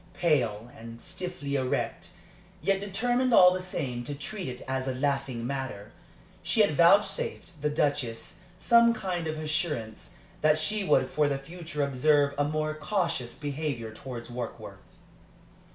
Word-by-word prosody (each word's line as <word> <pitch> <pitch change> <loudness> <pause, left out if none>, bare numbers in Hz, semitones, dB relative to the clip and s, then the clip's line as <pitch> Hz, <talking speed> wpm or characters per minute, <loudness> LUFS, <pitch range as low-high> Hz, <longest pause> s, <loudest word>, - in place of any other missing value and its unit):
Pale, 120 -9 +1
and 115 +1 -10
stiffly 180 -3 -5
erect, 130 -2 -1 0.5
yet 195 +1 +1
determined 245 +5 +1
all 180 -1 +8
the 185 - -3
same 130 -9 -3
to 145 - -5
treat 180 +7 -5
it 125 -1 -6
as 130 0 -2
a 130 - -1
laughing 135 -3 -1
matter, 130 -6 -4 0.5
she 220 - +2
had 180 -8 +3
vouchsafed 175 -2 +3
the 150 - +1
Duchess 140 -6 -1 0.2
some 235 +4 +5
kind 180 -5 -3
of 155 0 -3
assurance 155 - -3 0.3
that 155 0 +4
she 205 +7 0
would - - +2
for 150 -1 +2
the 140 - 0
future 155 +1 -5
observe 140 +1 +3
a - - +4
more 155 +1 -1
cautious 155 - -2
behavior 140 -6 -4
towards 120 0 -7
Warkworth. 120 -1 -6
150 Hz, 145 wpm, -28 LUFS, 130-180 Hz, 0.5 s, all